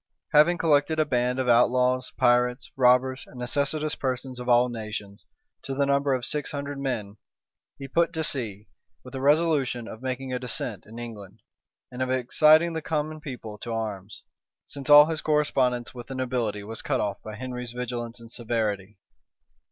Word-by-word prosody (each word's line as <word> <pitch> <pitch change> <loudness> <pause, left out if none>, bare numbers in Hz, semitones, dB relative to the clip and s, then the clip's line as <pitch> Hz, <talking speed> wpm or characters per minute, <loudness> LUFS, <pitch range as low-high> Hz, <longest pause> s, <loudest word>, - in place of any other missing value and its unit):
Having 155 +4 +6
collected 155 -1 +2
a 155 - +4
band 125 -2 0
of 130 -1 -1
outlaws, 125 +1 +3
pirates, 125 +4 +2
robbers, 130 0 +3
and - - -14
necessitous 145 +5 0
persons 130 -1 -3
of 125 0 -5
all 120 +1 +5
nations, 110 -3 -7 0.3
to 135 - -5
the 140 +1 +2
number 140 0 +2
of 125 - -4
six 150 -1 -1
hundred 140 -1 -5
men, 110 -7 -3 0.6
he 135 - -7
put 170 +4 +2
to 160 -1 -1
sea, 110 -8 -3 0.4
with 125 - -12
a 135 - -4
resolution 140 -5 +2
of 110 - -9
making 130 0 -4
a 125 - -1
descent 115 -5 -4
in 110 +2 -11
England, 110 -5 -9 0.5
and 125 +1 -6
of 130 - 0
exciting 155 +6 +4
the 160 - -3
common 155 0 -3
people 120 - -8
to 120 - -6
arms, 105 -3 -5 0.4
since 140 0 -6
all 145 0 +10
his 160 -1 -3
correspondence 130 -6 +1
with 120 -2 -9
the 135 - -6
nobility 120 -5 -2
was 110 +2 -6
cut - - -1
off 100 -1 -2
by 110 -1 -8
Henry 125 +1 -6
vigilance 120 -1 -5
and 115 0 -12
severity. 110 -4 -2
125 Hz, 175 wpm, -26 LUFS, 115-140 Hz, 0.6 s, all